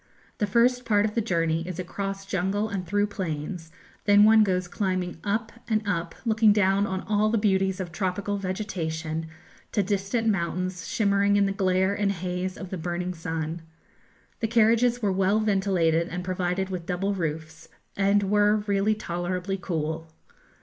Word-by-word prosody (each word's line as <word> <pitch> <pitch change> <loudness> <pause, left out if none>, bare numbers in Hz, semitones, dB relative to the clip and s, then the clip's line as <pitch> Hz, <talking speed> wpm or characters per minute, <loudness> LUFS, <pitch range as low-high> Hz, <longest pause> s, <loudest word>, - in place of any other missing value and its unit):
The 210 - +1
first 245 +4 +3
part 210 -3 +3
of 215 - -2
the 230 - +1
journey 165 -5 0
is 185 -2 -5
across 195 +2 -4
jungle 195 +3 -1
and 190 -4 -4
through 205 +3 +2
plains; 165 -3 -5 0.3
then 205 0 +6
one 220 +1 +7
goes 185 -3 0
climbing 185 -2 -2
up 220 +3 -1 0.2
and 215 -2 0
up, 170 -4 -2
looking 220 -1 +4
down 200 0 +3
on 190 0 -2
all 210 0 +1
the 225 - +2
beauties 190 -2 +1
of 180 -3 -4
tropical 195 +2 -2
vegetation, 165 -5 -3 0.5
to 205 - +2
distant 200 +4 -1
mountains 185 -2 -1
shimmering 200 -1 +2
in 200 0 +4
the 195 - 0
glare 190 0 +1
and 200 -1 0
haze 180 +1 -3
of 185 -3 -8
the 190 - -4
burning 175 +2 -3
sun. 165 -1 -4 0.8
The 225 - 0
carriages 230 +1 +3
were 200 - +2
well 195 +3 +2
ventilated 190 -6 +2
and 180 +1 -5
provided 185 +1 -1
with 175 -2 -5
double 195 +3 -1
roofs, 160 -2 -5 0.3
and 200 +1 +3
were 210 +1 +3
really 205 +1 +2
tolerably 180 0 -3
cool. 160 -2 -3
190 Hz, 165 wpm, -26 LUFS, 180-205 Hz, 0.8 s, one